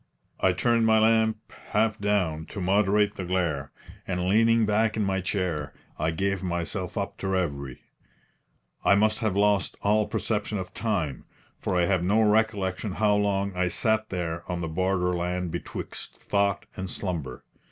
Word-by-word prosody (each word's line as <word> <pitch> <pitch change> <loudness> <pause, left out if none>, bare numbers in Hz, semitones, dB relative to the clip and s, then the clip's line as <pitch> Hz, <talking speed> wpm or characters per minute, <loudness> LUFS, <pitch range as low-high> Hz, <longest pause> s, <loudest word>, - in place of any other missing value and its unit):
I 95 - +4
turned 115 +4 +2
my 110 0 +5
lamp 110 0 +2 0.2
half 110 0 +2
down 95 -7 0
to - - -7
moderate 100 +2 +2
the 95 - -3
glare, 85 -7 -1 0.4
and 90 -1 -1
leaning 115 +3 +4
back 110 +1 +1
in 110 - +1
my 95 -1 0
chair, 85 -7 -2 0.2
I 80 +1 +1
gave 95 +3 -1
myself 90 +2 -3
up 100 -1 -3
to 95 - -3
reverie. 70 -9 -2 1.0
I 100 - +5
must 105 +1 +2
have 110 -5 0
lost 100 -1 +2
all 105 +1 +3
perception 105 -1 -2
of 95 -1 -6
time, 85 - -2 0.3
for - - -2
I 90 -1 +3
have 95 -1 +1
no 100 +5 +3
recollection 105 -2 +1
how 105 +1 +2
long 100 -1 0
I 90 0 +1
sat 110 +4 0
there 85 -2 -3
on 90 -1 -2
the 85 - -2
borderland 90 0 -1
betwixt - - -6
thought 100 -1 0
and 95 0 -4
slumber. 80 -11 -4
95 Hz, 160 wpm, -26 LUFS, 90-105 Hz, 1.0 s, my